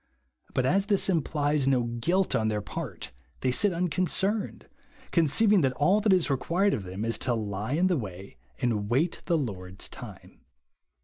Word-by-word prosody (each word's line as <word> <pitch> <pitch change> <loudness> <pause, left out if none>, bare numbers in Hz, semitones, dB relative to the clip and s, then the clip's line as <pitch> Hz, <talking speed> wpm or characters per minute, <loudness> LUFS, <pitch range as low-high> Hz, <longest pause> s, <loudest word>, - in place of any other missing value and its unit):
But 130 - +2
as 195 +7 +2
this 200 -2 +2
implies 150 -4 +1
no 130 -3 +3
guilt 120 +12 0
on 110 - +1
their 105 -1 0
part, 115 - -6 0.3
they 130 - +1
sit 200 +10 +2
unconcerned, 185 +4 -1 0.4
con 170 -2 +3
ceiving 205 +6 +4
that 135 -3 +2
all 185 +10 +3
that 210 -1 +3
is 185 -3 +3
required 170 +9 +1
of 100 - -3
them 95 +4 -4
is 115 - -1
to 125 -2 0
lie 105 +2 -3
in 170 +5 +2
the 185 -3 +2
way 95 - -7 0.2
and 105 -4 -1
wait 150 +8 +1
the 170 -2 +3
Lord's 95 -8 -5
time. - - -11
145 Hz, 175 wpm, -27 LUFS, 110-180 Hz, 0.4 s, ceiving